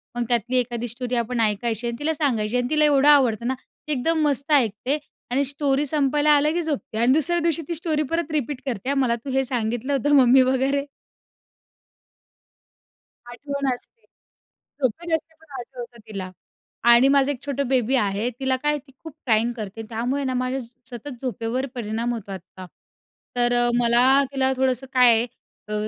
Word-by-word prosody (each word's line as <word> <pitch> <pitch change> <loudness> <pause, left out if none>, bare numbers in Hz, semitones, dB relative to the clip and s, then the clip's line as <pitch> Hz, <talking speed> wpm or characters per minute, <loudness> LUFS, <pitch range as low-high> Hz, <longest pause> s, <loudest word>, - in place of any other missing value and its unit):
मग 240 - -1
त्यातली 240 +2 0
एखादी 240 -1 -1
स्टोरी 245 +2 -3
आपण 235 +1 -1
ऐकायची 225 +2 0
आणि 235 - -3
तिला 315 +2 0
सांगायची 250 -7 0
आणि 245 0 -1
तिला 305 0 +3
एवढं 285 -1 +4
आवडतं 240 -6 +4
ना, 260 - +1
ती 285 +3 -12
एकदम 315 +4 +1
मस्त 280 +1 -1
ऐकते 255 0 +2 0.3
आणि 270 +3 +2
स्टोरी 280 +1 0
संपायला 295 +1 +2
आला, 295 +1 +2
की 345 +2 -1
झोपते 295 -8 -4
आणि 235 +3 +3
दुसऱ्या 340 +4 +1
दिवशी 330 -1 +1
ती 340 - -3
स्टोरी 315 -2 -1
परत 330 -1 -1
रिपीट 290 -3 -2
करते. 260 +1 -2
मला 260 -4 +1
तू - - -4
हे 265 +1 +1
सांगितलं 240 +1 -2
होतं 290 +2 +2
मम्मी 260 -1 +6
वगैरे. 265 +2 +1 2.4
आठवण 280 +3 -4
असते. 445 - -14 0.8
झोपेत 325 +7 -1
असते 320 0 -7
पण 320 -2 -22
आठवतं 240 -1 -9
तिला. 190 -3 -6 0.6
आणि 235 +3 +7
माझं 280 0 +3
एक 265 - -6
छोटं 280 -1 -2
बेबी 255 0 +1
आहे. 210 0 0
तिला 265 -1 +1
काय 295 +3 0
ती 275 0 -21
खूप 320 -2 -9
क्राईंग 230 -1 +2
करते. 215 -2 -7
त्यामुळे 245 +5 -2
ना 260 -1 -1
माझ्या 255 +1 -1 0.3
सतत 245 +1 -8
झोपेवर 250 0 -2
परिणाम 230 +1 -2
होतो 210 -4 -7
आत्ता. 185 0 -9 0.7
तर 245 0 +2
अ, 240 0 +3
मला 245 +4 +5
तिला 265 -1 +1
थोडंसं 260 0 0
काय 240 -3 +5 0.4
अ, 210 - -5
255 Hz, 170 wpm, -23 LUFS, 235-285 Hz, 2.4 s, आणि